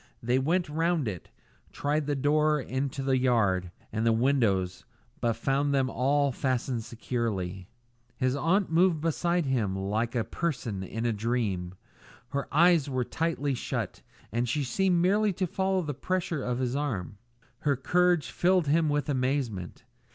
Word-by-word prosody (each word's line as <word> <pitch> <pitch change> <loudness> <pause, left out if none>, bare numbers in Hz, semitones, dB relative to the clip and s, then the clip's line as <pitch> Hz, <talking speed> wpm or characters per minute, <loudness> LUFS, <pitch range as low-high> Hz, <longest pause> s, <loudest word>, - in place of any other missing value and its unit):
They 125 +2 +2
went 170 +6 +1
round 160 -2 0
it, 95 -5 -5 0.4
tried 145 0 -1
the 145 - 0
door 150 +2 +2
into 135 +1 -3
the 135 -1 +2
yard, 100 -8 +2 0.2
and 110 0 -1
the 115 - +4
windows, 110 -7 +1 0.4
but 115 -1 +1
found 140 +5 0
them 130 -1 +1
all 140 +2 +2
fastened 125 -2 -1
securely. 105 -6 -3 0.5
His 130 +1 +1
aunt 170 +6 +1
moved 170 0 +4
beside 170 +2 0
him 115 -8 0
like 105 +5 -1
a 115 - +1
person 125 - -3
in 110 +5 -4
a 120 - +2
dream. 105 -5 -2 0.5
Her 140 0 -2
eyes 165 -2 +4
were 130 -2 0
tightly 160 -2 -1
shut, 125 - -4 0.3
and 120 +3 0
she 145 +4 0
seemed 180 +6 +1
merely 205 +2 +3
to 185 +1 -1
follow 190 +1 0
the 150 -2 -3
pressure 170 +1 -2
of 125 -1 -2
his 130 0 -1
arm. 105 -9 -3 0.4
Her 145 -2 +1
courage 175 +5 +2
filled 180 -1 +2
him 155 +2 +2
with 145 +1 0
amazement. 130 - -2
135 Hz, 155 wpm, -28 LUFS, 115-155 Hz, 0.5 s, the